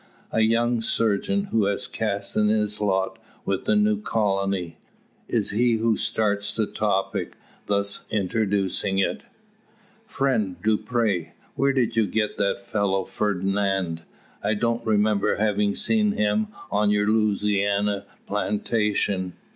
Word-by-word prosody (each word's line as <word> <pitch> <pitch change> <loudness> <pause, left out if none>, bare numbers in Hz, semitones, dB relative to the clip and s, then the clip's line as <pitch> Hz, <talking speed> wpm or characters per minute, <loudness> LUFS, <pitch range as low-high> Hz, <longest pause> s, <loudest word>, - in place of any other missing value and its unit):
A 110 - +2
young 115 +1 +2
surgeon, 115 - +1
who 110 -3 +2
has 100 0 -1
cast 105 -3 -2
in 105 0 +3
his 105 -1 0
lot 95 -2 0 0.3
with 95 -1 -1
the - - +3
new 210 0 +2
colony, 100 - -1 0.5
is - - 0
he 120 +3 +2
who 115 0 +2
starts 105 -2 0
the 110 - 0
topic, 100 -2 -1 0.3
thus 100 0 0
introducing 100 -1 0
it: 95 - 0 0.9
"Friend 130 - 0
Dupre, 110 -6 0 0.2
where 140 0 +2
did 125 -4 0
you 110 -2 +3
get 105 +2 -1
that 100 0 0
fellow 100 -1 0
Fernand? 95 -3 -1 0.4
I 105 +2 +1
don't 115 +2 0
remember 105 -2 +2
having 105 -1 +1
seen 215 -2 +2
him 105 - +1 0.2
on 105 0 +2
your 105 0 +2
Louisiana 105 -1 +1 0.2
plantation." 105 -3 -1
105 Hz, 125 wpm, -24 LUFS, 100-110 Hz, 0.9 s, in